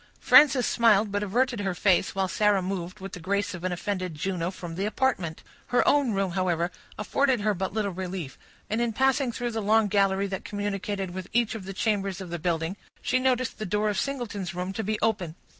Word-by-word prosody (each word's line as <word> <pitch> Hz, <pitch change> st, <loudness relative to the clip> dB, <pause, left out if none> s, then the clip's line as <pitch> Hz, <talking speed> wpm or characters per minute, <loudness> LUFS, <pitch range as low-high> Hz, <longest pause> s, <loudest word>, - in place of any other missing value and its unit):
Frances 270 Hz, -5 st, +6 dB
smiled, 215 Hz, -3 st, +3 dB
but 205 Hz, 0 st, -1 dB
averted 240 Hz, +4 st, 0 dB
her 190 Hz, -3 st, -1 dB
face, 185 Hz, 0 st, +2 dB
while 190 Hz, -1 st, +1 dB
Sarah 205 Hz, 0 st, +2 dB
moved, 185 Hz, +1 st, -4 dB
with 195 Hz, 0 st, -7 dB
the -, -, -6 dB
grace 200 Hz, +4 st, -1 dB
of 175 Hz, -1 st, -8 dB
an 185 Hz, -, -1 dB
offended 185 Hz, -1 st, -3 dB
Juno, 180 Hz, +1 st, -2 dB
from 175 Hz, -3 st, -7 dB
the 195 Hz, +5 st, -1 dB
apartment. 210 Hz, -9 st, -1 dB, 0.2 s
Her 245 Hz, -, +2 dB
own 280 Hz, -6 st, +3 dB
room, 195 Hz, -2 st, 0 dB
however, 175 Hz, -1 st, 0 dB, 0.3 s
afforded 250 Hz, +4 st, +1 dB
her 210 Hz, 0 st, +2 dB
but 190 Hz, 0 st, -3 dB
little 210 Hz, -1 st, -1 dB
relief, 180 Hz, -5 st, -5 dB, 0.3 s
and 220 Hz, +2 st, -1 dB
in 235 Hz, -1 st, 0 dB
passing 265 Hz, +1 st, +2 dB
through 240 Hz, +1 st, -3 dB
the 225 Hz, -1 st, -2 dB
long 215 Hz, +1 st, +3 dB
gallery 195 Hz, -1 st, +2 dB
that 195 Hz, -1 st, -4 dB
communicated 205 Hz, -2 st, -3 dB
with 185 Hz, 0 st, -7 dB
each 235 Hz, -1 st, +2 dB
of 215 Hz, -4 st, -7 dB
the 195 Hz, -, -6 dB
chambers 195 Hz, -2 st, -1 dB
of 185 Hz, -3 st, -7 dB
the 175 Hz, -, -3 dB
building, 165 Hz, +2 st, -1 dB, 0.3 s
she 255 Hz, +1 st, +2 dB
noticed 255 Hz, -1 st, 0 dB
the -, -, -3 dB
door 210 Hz, +3 st, +1 dB
of 205 Hz, -, -1 dB
Singleton's 210 Hz, -10 st, -3 dB
room 180 Hz, +2 st, -3 dB
to 220 Hz, -, -3 dB
be 215 Hz, +1 st, -1 dB
open. 195 Hz, -8 st, 0 dB
200 Hz, 210 wpm, -27 LUFS, 185-220 Hz, 0.3 s, Frances